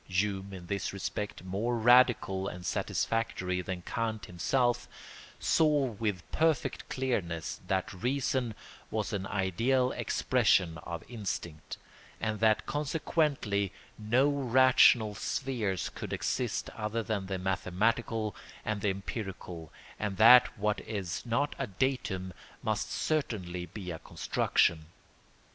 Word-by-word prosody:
Hume, 95 Hz, +1 st, -1 dB
in 95 Hz, -2 st, -8 dB
this 100 Hz, +2 st, -2 dB
respect 100 Hz, 0 st, -4 dB
more 105 Hz, +6 st, -1 dB
radical 115 Hz, -5 st, +4 dB
and 90 Hz, -1 st, -7 dB
satisfactory 95 Hz, -3 st, -1 dB
than 90 Hz, -1 st, -5 dB
Kant 110 Hz, 0 st, -2 dB
himself, 120 Hz, +8 st, 0 dB, 0.5 s
saw 150 Hz, -3 st, +3 dB
with 105 Hz, -4 st, -2 dB
perfect 160 Hz, -2 st, 0 dB
clearness 100 Hz, -11 st, -2 dB
that 95 Hz, 0 st, -1 dB
reason 125 Hz, +2 st, -1 dB, 0.3 s
was -, -, -2 dB
an 95 Hz, -1 st, -2 dB
ideal 115 Hz, +7 st, +1 dB
expression 95 Hz, -10 st, +2 dB
of 85 Hz, +1 st, -6 dB
instinct, 95 Hz, -9 st, -5 dB, 0.4 s
and 110 Hz, -1 st, -2 dB
that 110 Hz, 0 st, +3 dB
consequently 145 Hz, -, 0 dB, 0.2 s
no 120 Hz, +6 st, +2 dB
rational 130 Hz, -5 st, +5 dB
spheres 105 Hz, -5 st, -2 dB
could -, -, -6 dB
exist -, -, -1 dB
other 110 Hz, +2 st, -3 dB
than 105 Hz, -3 st, -2 dB
the 95 Hz, -1 st, -2 dB
mathematical 105 Hz, +4 st, 0 dB, 0.3 s
and 105 Hz, -2 st, -1 dB
the 105 Hz, -, +2 dB
empirical, 95 Hz, -4 st, -5 dB, 0.3 s
and 105 Hz, -3 st, -2 dB
that 125 Hz, +3 st, +8 dB
what 105 Hz, 0 st, 0 dB
is 95 Hz, -6 st, -4 dB
not 140 Hz, +6 st, 0 dB
a 135 Hz, -, -1 dB
datum 95 Hz, -4 st, -1 dB, 0.3 s
must -, -, -1 dB
certainly 90 Hz, -, -2 dB
be 90 Hz, +1 st, -7 dB
a 80 Hz, -, -6 dB
construction. 80 Hz, -2 st, +1 dB
105 Hz, 115 wpm, -30 LUFS, 95-125 Hz, 0.5 s, that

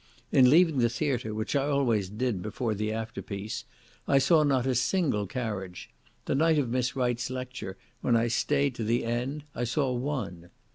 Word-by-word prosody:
In 130 Hz, -2 st, +6 dB
leaving 160 Hz, -1 st, +5 dB
the 120 Hz, -1 st, +3 dB
theatre, 120 Hz, -2 st, -1 dB
which 110 Hz, +5 st, -3 dB
I 140 Hz, -1 st, +2 dB
always 120 Hz, -9 st, +1 dB
did 110 Hz, -2 st, -2 dB
before 110 Hz, +3 st, -2 dB
the 105 Hz, +1 st, -2 dB
afterpiece, 110 Hz, -2 st, -5 dB, 0.4 s
I 135 Hz, -, +4 dB
saw 155 Hz, +4 st, +5 dB
not 135 Hz, -4 st, +2 dB
a 130 Hz, -, +2 dB
single 130 Hz, -, +1 dB
carriage; 100 Hz, -6 st, -5 dB, 0.3 s
the -, -, 0 dB
night 160 Hz, +3 st, +3 dB
of 130 Hz, -5 st, 0 dB
Miss 125 Hz, +1 st, 0 dB
Wright's 125 Hz, -2 st, 0 dB
lecture, 125 Hz, -6 st, -6 dB, 0.2 s
when 120 Hz, -, +2 dB
I 115 Hz, +1 st, +3 dB
stayed 140 Hz, +3 st, +1 dB
to 115 Hz, -, -2 dB
the 115 Hz, +3 st, +1 dB
end, 125 Hz, +5 st, -2 dB
I 120 Hz, -, -3 dB
saw 130 Hz, +3 st, 0 dB
one. 120 Hz, -, -4 dB
125 Hz, 180 wpm, -28 LUFS, 110-135 Hz, 0.4 s, In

